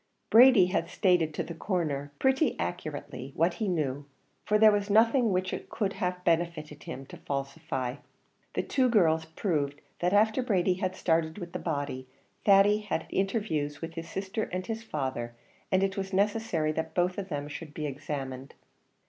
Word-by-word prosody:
Brady 235 -4 +8
had 170 -2 -1
stated 180 -5 +2
to - - -1
the 170 - -7
Coroner 155 -6 -2
pretty 265 +3 +2
accurately 145 -5 -5
what 170 +2 +2
he 215 - +1
knew, 145 -5 -1 0.4
for 210 - +3
there 215 0 +7
was 205 0 0
nothing 230 +3 +4
which 185 0 0
it - - -6
could 200 -3 -1
have 180 -2 -3
benefited 165 -3 0
him 135 - -6
to - - -11
falsify. 135 -2 -3 0.6
The - - 0
two 260 -2 +2
girls 160 -8 +3
proved 150 -4 -2 0.2
that 175 +1 +1
after 215 +4 +3
Brady 190 -6 +2
had 185 0 -2
started 160 -2 +1
with 175 -4 -7
the - - -3
body, 140 -5 -3 0.4
Thady 205 +1 +6
had 210 -6 -2
had - - -13
interviews 190 -8 -1
with 165 0 -6
his 165 0 -7
sister 195 +4 -3
and 185 0 -4
his 225 +2 -4
father, 130 - -4 0.4
and 185 0 +3
it 195 0 -1
was 195 0 -3
necessary 200 -6 +1
that 160 +1 -4
both 180 +2 +1
of 195 -1 -5
them 145 -2 -3
should 150 +1 -8
be 155 - -3
examined. 135 -2 -5
175 Hz, 175 wpm, -29 LUFS, 150-200 Hz, 0.6 s, Brady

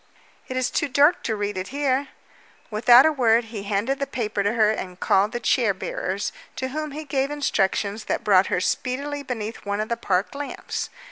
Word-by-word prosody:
"It 255 - -4
is 255 - 0
too - - 0
dark 285 +5 +4
to 220 - 0
read 205 -2 -2
it 185 - -5
here." 275 0 0 0.6
Without 240 +4 +7
a 315 - +5
word 240 -5 +3
he 210 - -4
handed 205 +7 -1
the 275 - -1
paper 215 -4 -2
to 205 +2 +1
her 215 -2 +4
and 185 -4 -5
called 200 +2 +2
the 240 - -3
chair 230 -4 +2
bearers, 190 +1 -3 0.2
to 260 - -3
whom 305 +3 -3
he 300 +2 -6
gave 275 -1 0
instructions 215 -7 -1
that - - -2
brought 195 -2 +4
her 180 - 0
speedily 275 +9 -2
beneath 230 -5 -5
one 205 0 -2
of 215 - -2
the 235 - -1
park 190 -4 0
lamps. 285 0 -5
230 Hz, 200 wpm, -24 LUFS, 205-275 Hz, 0.6 s, Without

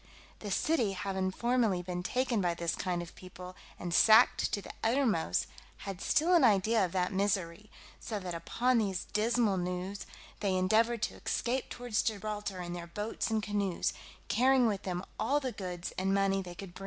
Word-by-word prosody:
The 210 - -6
city 230 - +1
having 190 0 -2
formerly 225 -3 +1
been 180 0 -4
taken 245 +2 0
by 175 -2 0
this 170 -1 -1
kind 180 -2 -2
of 170 - -12
people, 185 0 -11 0.2
and 175 -1 -4
sacked 220 +6 +6
to - - 0
the - - -9
uttermost, 225 - +1 0.4
had 195 -2 -6
still 335 +4 +2
an 345 - +6
idea 215 +1 +4
of 180 - -1
that 180 0 0
misery; 195 0 -1 0.3
so 215 -2 -4
that 185 -2 -5
upon 235 +9 +1
these 195 -4 -1
dismal 220 -2 +2
news 180 +2 -4 0.3
they 195 -2 0
endeavoured 220 +5 +2
to - - -3
escape 250 +2 -1
towards 245 -3 -1
Gibraltar 210 -2 -3
in 175 0 -5
their 170 -1 -6
boats 210 +7 -3
and 220 -1 0
canoes, 200 -4 -1 0.3
carrying 255 +2 +4
with 205 -4 0
them 180 0 -4
all 270 +7 +2
the 260 -3 -3
goods 180 -5 -6
and 190 +1 0
money 195 0 +2
they 175 -2 -9
could. 185 -1 -9
200 Hz, 180 wpm, -31 LUFS, 180-225 Hz, 0.4 s, sacked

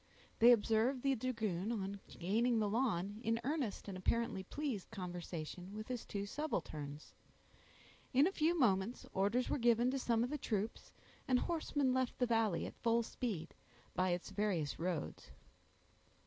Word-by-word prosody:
They 235 +2 +9
observed 230 +3 +3
the 275 -1 +3
dragoon, 220 -6 -1
on 200 -3 -3
gaining 225 +7 +1
the 215 -1 +2
lawn, 205 -3 0
in 225 +1 +1
earnest 270 -9 -2
and 195 - -5
apparently 220 +2 0
pleased 245 0 -4
conversation 180 -1 -6
with 215 +2 -6
his 250 -2 -4
two 200 -1 -3
subalterns. 155 - -4 1.0
In 270 +3 +5
a 375 - +2
few 340 -1 +2
moments 215 - +2
orders 205 +6 +2
were - - 0
given 240 +1 +4
to 270 - -1
some 235 -2 +2
of 250 - -2
the 300 - -2
troops, 215 -2 -2 0.4
and 255 - +4
horsemen 290 -3 0
left 260 -1 0
the 250 - +3
valley, 225 -7 +2
at - - -9
full 235 0 +3
speed, 205 -9 -4 0.4
by 185 0 +2
its 175 +2 -2
various 190 -7 -1
roads. 170 -3 -3
225 Hz, 155 wpm, -37 LUFS, 190-250 Hz, 1.0 s, They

